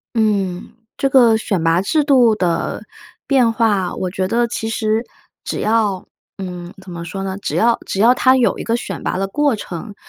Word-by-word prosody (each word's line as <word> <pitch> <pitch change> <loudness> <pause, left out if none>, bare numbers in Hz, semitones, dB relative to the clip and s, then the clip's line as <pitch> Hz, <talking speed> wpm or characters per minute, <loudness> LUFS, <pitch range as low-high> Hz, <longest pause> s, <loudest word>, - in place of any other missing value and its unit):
嗯， 200 -4 0 0.2
这 275 - +1
个 240 -4 +5
选 195 -6 -2
拔 165 +2 +3
制 300 +10 +1
度 255 -6 +4
的 175 -5 -1 0.4
变 250 -5 +3
化， 205 -5 +1
我 185 - -3
觉 185 0 -2
得 235 +4 +1
其 225 -1 -4
实 220 +1 -1 0.4
只 - - -4
要， 210 -4 0 0.3
嗯， 180 -2 -7
怎 185 - -11
么 170 -1 -6
说 195 +3 -5
呢， 190 0 -4
只 - - -4
要 235 +1 +3
只 195 - -4
要 235 +4 +6
它 260 +1 +4
有 250 -2 +2
一 - - -5
个 230 - 0
选 240 - -5
拔 - - -2
的 195 - -1
过 285 +4 +1
程， 200 +1 -7
215 Hz, 210 characters per minute, -18 LUFS, 185-235 Hz, 0.4 s, 要